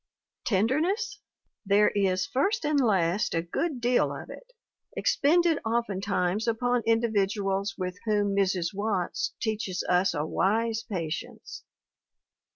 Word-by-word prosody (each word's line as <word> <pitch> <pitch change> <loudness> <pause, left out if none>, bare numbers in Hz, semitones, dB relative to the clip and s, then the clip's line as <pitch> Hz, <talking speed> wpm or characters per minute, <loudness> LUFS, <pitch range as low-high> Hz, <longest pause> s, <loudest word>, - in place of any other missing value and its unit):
Tenderness? 305 - 0 0.4
There 205 0 +4
is 190 -2 +1
first 330 - 0
and 295 -1 +2
last 195 -5 +1
a 165 - 0
good 265 - -2
deal 240 +1 +2
of - - -8
it, - - -12 0.5
expended 330 +2 +3
oftentimes 205 -3 -1
upon 245 +2 +1
individuals 200 -3 +1
with 180 -1 -4
whom 205 -2 +1
Mrs. 190 -3 0
Watts 200 -3 -2
teaches 215 -4 -2
us 180 0 +2
a 150 +1 -1
wise 220 +6 0
patience. 175 -9 -6
210 Hz, 115 wpm, -27 LUFS, 190-240 Hz, 0.5 s, There